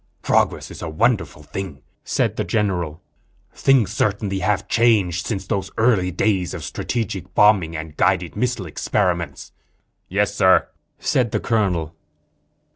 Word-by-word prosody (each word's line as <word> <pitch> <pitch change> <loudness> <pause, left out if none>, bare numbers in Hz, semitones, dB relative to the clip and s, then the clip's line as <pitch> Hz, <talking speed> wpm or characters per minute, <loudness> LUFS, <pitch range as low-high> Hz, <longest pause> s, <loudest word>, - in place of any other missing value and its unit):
"Progress - - +1
is - - -9
a - - -4
wonderful 105 -2 0
thing," 90 -2 -6 0.2
said - - 0
the - - -1
general. 90 -7 -1 0.5
"Things 125 -8 +3
certainly 100 -2 0
have 100 0 0
changed 100 -7 +2
since 95 -4 -3
those 95 +1 -2
early 110 -6 +3
days 95 -1 0
of - - -7
strategic 110 -6 -3
atomic 95 - -29
bombing 95 -6 +4
and 80 -1 -7
guided 85 -1 +1
missile 120 -2 -1
experiments." 85 -2 -2 0.6
"Yes, 100 +2 +1
Sir," 95 -3 +4 0.3
said 125 -3 +1
the - - -1
colonel. 90 -8 0
95 Hz, 135 wpm, -21 LUFS, 90-110 Hz, 0.6 s, bombing